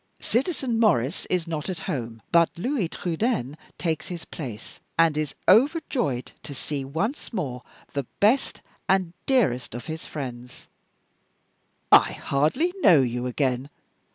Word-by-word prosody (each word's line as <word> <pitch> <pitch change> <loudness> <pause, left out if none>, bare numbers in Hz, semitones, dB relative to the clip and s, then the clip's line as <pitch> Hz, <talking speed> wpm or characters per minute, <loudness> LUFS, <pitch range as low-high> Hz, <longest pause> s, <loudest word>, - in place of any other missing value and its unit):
Citizen 255 -3 0
Maurice 155 - +2
is 180 -2 0
not 160 0 -4
at 185 - -4
home; 115 -4 -4
but 170 -1 +5
Louis 235 - 0
Trudaine 175 - -1 0.2
takes 165 -3 -2
his 175 -2 -6
place, 120 -8 -8 0.2
and 165 -2 +4
is 155 -1 -2
overjoyed 240 - +3
to 140 - -8
see 140 +1 -4
once 165 - -3
more 135 - -3 0.3
the 140 -4 -2
best 230 +7 +2 0.3
and 185 -3 +2
dearest 175 - +2
of 120 - -6
his 160 0 -6
friends!" 125 -4 -7 1.2
"I - - +7
hardly 155 - +1
know 165 - +7
you 125 0 -1
again. 130 +1 -1
160 Hz, 130 wpm, -25 LUFS, 130-210 Hz, 1.2 s, I